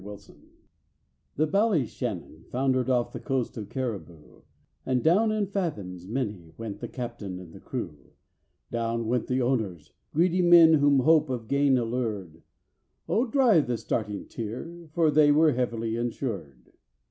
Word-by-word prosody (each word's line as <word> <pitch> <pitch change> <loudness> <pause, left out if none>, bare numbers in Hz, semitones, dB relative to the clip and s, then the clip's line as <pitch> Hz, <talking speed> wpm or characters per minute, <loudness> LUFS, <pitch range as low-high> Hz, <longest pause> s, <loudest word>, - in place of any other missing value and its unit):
THE 155 - +2
Ballyshannon 130 - -1
foundered 130 0 0
off 125 -2 +1
the - - -5
coast 130 -4 -2
of 105 -3 -7
Cariboo, 105 - -6 0.4
And 130 -2 0
down 205 +7 +4
in 215 -1 0
fathoms 105 - -4
many 105 -8 -4
went 110 -3 -6
the - - -5
captain 120 -7 -6
and 90 -3 -11
the - - -11
crew; - - -7 0.6
Down 115 0 -1
went 120 +1 0
the 130 0 0
owners—greedy 130 - -1
men 170 -2 +7
whom 145 -3 +4
hope 155 +1 +4
of 120 -4 -4
gain 140 0 +3
allured: 110 -9 -3 0.7
Oh, 240 +4 +1
dry 235 - +4
the 125 -5 -1
starting 105 -2 -3
tear, 160 +10 -7
for 160 -1 +2
they 150 -1 +5
were 155 +1 +5
heavily 115 -3 -1
insured. 105 - -5
125 Hz, 135 wpm, -27 LUFS, 110-155 Hz, 0.7 s, men